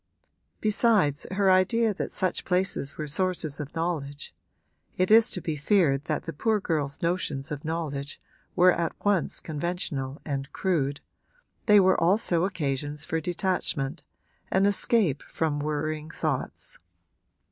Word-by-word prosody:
Besides 210 - +2
her 190 0 +3
idea 215 +4 +3
that - - -4
such 185 -2 -1
places 180 -6 0
were 155 - -4
sources 165 -2 -1
of 150 +1 -7
knowledge 155 -4 -3 0.6
(it 185 +2 +1
is 225 +1 +7
to 180 - -3
be 160 - -2
feared 150 -3 +2
that - - -2
the 165 - -6
poor 215 +8 +1
girl's 150 -7 -2
notions 160 -4 -1
of 145 -1 -5
knowledge 150 -3 -4 0.4
were 180 0 +6
at 170 -1 -2
once 205 -4 +1
conventional 150 -4 -3
and 140 -1 -3
crude) 145 -7 -1 0.7
they 210 -1 +8
were 190 -2 +4
also 175 -1 +2
occasions 150 -4 -2
for 160 0 -1
detachment, 170 -4 -1 0.5
an 190 +1 +3
escape 200 - +3
from 155 -3 -2
worrying 155 +1 -2
thoughts. - - -3
165 Hz, 135 wpm, -27 LUFS, 145-185 Hz, 0.7 s, they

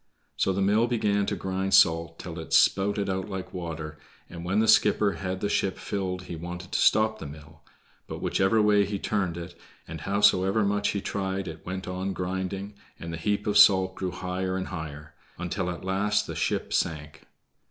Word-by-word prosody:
So - - +1
the 95 +1 0
mill 105 +4 +3
began 105 -4 +1
to 100 - -1
grind 95 +1 0
salt 85 -1 +4
till 85 -2 -7
it 80 - -7
spouted 100 +1 +3
out 95 +1 -2
like 95 -1 -6
water, 80 -3 -6 0.3
and 85 -1 -8
when 95 +3 -1
the 110 +1 +3
skipper 105 -1 +4
had 95 +1 -4
the 100 - 0
ship 95 -2 0
filled 90 -2 -3
he 90 -1 -7
wanted 90 +2 -7
to - - 0
stop 110 0 +3
the 80 - -6
mill, 75 +1 -13 0.5
but - - -6
whichever 95 +4 +2
way 105 -1 +4
he 100 +1 -3
turned 95 -4 -1
it 85 +1 -7 0.3
and 80 -1 -7
howsoever 100 +1 +3
much 105 0 +1
he 100 - -2
tried 95 -1 -3
it 80 -1 -8
went 95 0 -4
on 95 +1 -3
grinding, 95 +2 -4 0.3
and 85 0 -6
the - - -4
heap 105 +5 -1
of 105 0 +3
salt 95 -1 +6
grew 95 0 -3
higher 95 +1 -3
and 95 - -4
higher, 75 -3 -7 0.2
until 90 +1 -3
at 90 +1 -6
last 105 +2 +1
the - - -6
ship - - -1
sank. 75 -2 -2
95 Hz, 195 wpm, -27 LUFS, 85-100 Hz, 0.5 s, salt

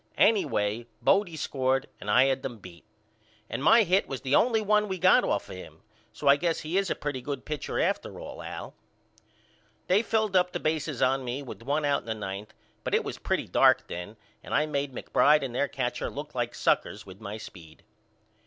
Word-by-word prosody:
Anyway 115 - +2
Bodie 195 - +2
scored 135 -2 0
and 105 - -7
I 125 +5 +6
had 135 -1 +1
them 120 -4 -5
beat. 90 -4 -14 0.6
And 135 - -4
my 230 +8 +7
hit 190 +1 +2
was 135 - -5
the 135 0 -2
only 230 +6 +4
one 210 0 +2
we 190 -1 -3
got 185 +1 +5
off 100 - -1
of - - -8
him 90 - -12 0.3
so 145 - -5
I 140 +1 +7
guess 165 +1 -1
he 160 +3 -4
is 195 -1 +1
a - - 0
pretty 145 -3 -4
good 140 +1 -5
pitcher 150 -2 -3
after - - -1
all - - -8
Al. - - -7 1.1
They 190 +3 +3
filled 220 -3 0
up 180 -1 +3
the - - -2
bases 155 -3 -1
on 135 +1 +2
me 130 +3 -4
with 125 - -9
one 145 +5 -1
out 140 -1 +1
in - - -20
the 110 - -2
ninth 100 0 -6 0.3
but - - 0
it - - +2
was - - -6
pretty - - -1
dark - - +4
then 90 +5 -7 0.3
and - - -3
I 150 - +3
made 140 -2 -2
McBride 150 +4 +3
and 130 -3 -4
their 140 +3 +1
catcher 125 -3 -3
look 145 +1 -7
like 120 -1 -2
suckers 105 - 0
with 95 +2 -13
my 105 0 -6
speed. 85 -7 -12
140 Hz, 210 wpm, -28 LUFS, 115-165 Hz, 1.1 s, my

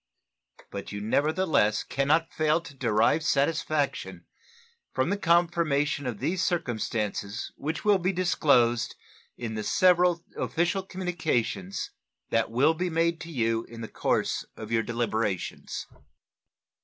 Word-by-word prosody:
But 100 -1 -6
you 100 - -4
nevertheless 145 - +2
can 140 +1 -1
not 160 +2 +2
fail 155 +1 +2
to 165 -4 -12
derive 120 +3 +2
satisfaction 150 0 0 0.7
from 130 +7 0
the - - +2
confirmation 165 -6 +2
of 120 -4 -3
these 180 - -1
circumstances 110 - -2
which 155 +8 -4
will 205 -2 +5
be 185 +2 +1
disclosed 140 -10 +2 0.4
in 115 -2 -4
the 110 -1 -3
several 180 - +3
official 170 +3 0
communications 165 - -2 0.4
that 115 -1 +2
will 135 +8 +3
be 180 +2 -2
made 165 0 +1
to 170 - -7
you 115 -4 0
in 115 0 -10
the 115 - -5
course - - 0
of 110 0 -8
your 115 -1 +3
deliberations. 115 -5 -2
145 Hz, 130 wpm, -27 LUFS, 115-170 Hz, 0.7 s, will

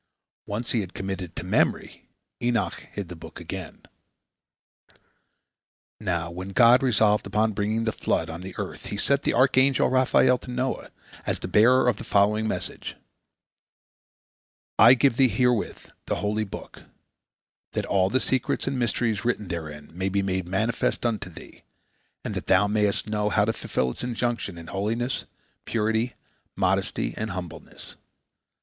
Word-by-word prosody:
Once 110 +4 -3
he 115 - +2
had 95 -2 -8
committed 95 -2 -4
it - - -29
to - - -5
memory, - - 0 0.3
Enoch 120 -2 -1
hid 100 -3 -5
the 90 - -8
book 80 - -11
again. - - -7 2.2
Now, 85 -5 -2
when 90 +2 -6
God 120 +4 +6
resolved 110 -5 +3
upon 110 +1 +1
bringing 105 +2 -1
the 110 - 0
flood - - -1
on 80 +2 -7
the 95 0 -8
earth, - - -6
He 105 - -4
sent 140 +6 +2
the - - 0
archangel 130 +1 +4
Raphael 130 -1 +4
to 125 - -11
Noah, 125 +1 -2 0.4
as - - 0
the - - -6
bearer 125 +4 +5
of 120 -5 +2
the - - -6
following 105 +2 +2
message: - - -4 1.8
"I 120 +2 +9
give 130 -1 +2
thee 135 - +6
herewith 125 -2 0 0.2
the - - 0
holy 105 +1 -1
book, 100 - -9 0.9
that - - -1
all 95 -1 +2
the 130 - +2
secrets 130 -1 0
and 135 -1 -1
mysteries 115 -2 0
written 110 -5 -1
therein 75 -4 -6
may 95 +3 -1
be 100 +1 0
made 95 -2 -1
manifest 110 +6 0
unto 110 -5 -1
thee, 85 - -13 0.6
and - - -3
that - - -5
thou 105 - +5
mayest 105 -1 +1
know 105 -1 0
how 105 -1 +3
to 110 - 0
fulfil 65 -10 -1
its - - -8
injunction 120 -6 -2
in 85 - -9
holiness, 110 +8 -2 0.4
purity, 110 +2 0 0.4
modesty, - - 0
and 110 +1 -3
humbleness. 90 -4 -8
110 Hz, 155 wpm, -25 LUFS, 95-120 Hz, 2.2 s, I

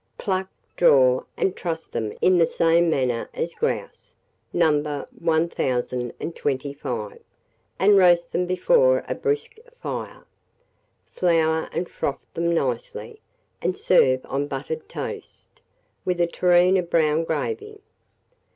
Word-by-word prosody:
Pluck, 190 -1 -2 0.3
draw, 130 -6 +5
and 190 - 0
truss 165 -2 -4
them 110 -2 -3
in 180 -1 +4
the 165 - +4
same 165 +1 +3
manner 125 -6 0
as - - -3
grouse, - - -4 0.4
No. 150 -2 +3 0.4
1025, 135 -4 -2 0.6
and 200 +1 +5
roast 175 -2 +4
them 180 +1 0
before - - +3
a - - -1
brisk 440 0 -2 0.2
fire. - - -6 0.9
Flour 160 -2 +1
and 175 - -2
froth 140 - -4
them 170 0 0
nicely, 465 - -3 0.4
and 185 - -1
serve 130 -8 +3
on 140 +1 -2
buttered 145 +3 -5
toast, - - -8 0.4
with 180 -1 -1
a 175 - +4
tureen 180 +2 +3
of 175 -2 -2
brown 160 -1 +2
gravy. 425 - -3
170 Hz, 115 wpm, -23 LUFS, 140-185 Hz, 0.9 s, draw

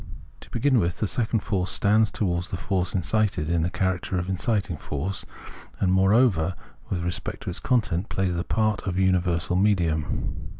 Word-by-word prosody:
To - - -14
begin 130 +1 +2
with, 85 -2 0
the - - 0
second 110 0 0
force 95 -3 -1
stands 105 +1 +3
towards 90 -3 -1
the 90 - -3
force 90 +1 -1
incited 95 -3 0
in 85 -1 +2
the 85 - +1
character 95 0 -1
of 90 +1 -2
inciting 100 -2 -1
force, 80 +7 -4 0.5
and, 95 -1 +2
moreover, 95 -3 +3 0.3
with 85 -2 -2
respect 90 0 -3
to - - -3
its 90 - -7
content, 105 -7 0
plays 95 -2 0
the 85 0 -1
part 110 0 0
of 90 -1 -1
universal 90 -2 +1
medium. 90 -6 +1
95 Hz, 170 wpm, -25 LUFS, 85-105 Hz, 0.5 s, stands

